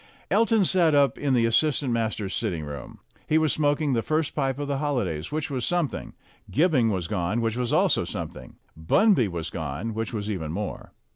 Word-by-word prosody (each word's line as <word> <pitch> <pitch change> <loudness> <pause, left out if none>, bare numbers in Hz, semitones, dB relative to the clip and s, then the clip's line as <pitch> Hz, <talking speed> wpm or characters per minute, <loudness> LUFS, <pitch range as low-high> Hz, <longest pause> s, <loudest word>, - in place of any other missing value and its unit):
Elton 225 -3 +3
sat 170 -4 +3
up 140 -1 +4
in 140 -3 +1
the 115 -1 +3
assistant 135 +2 +2
masters' 110 -4 -2
sitting 80 -4 -2
room. 75 -3 -8 0.3
He 155 - +3
was 155 -2 +2
smoking 145 -1 +1
the 115 - +1
first 155 +4 -1
pipe 135 -3 -1
of 145 0 -3
the 140 -1 -1
holidays, 105 - -2
which 150 -1 -2
was 130 -3 -2
something; 175 -5 -2 0.3
Gibbing 145 -6 +3
was 95 -5 -2
gone, 100 +2 -1
which 115 -1 0
was 125 -1 -1
also - - +3
something; - - -7 0.2
Bunby 125 - +3
was 85 -3 -5
gone, 80 +8 -4
which 110 0 -3
was 105 -3 -4
even 80 -6 -3
more. 100 +3 -5
120 Hz, 190 wpm, -25 LUFS, 100-150 Hz, 0.3 s, up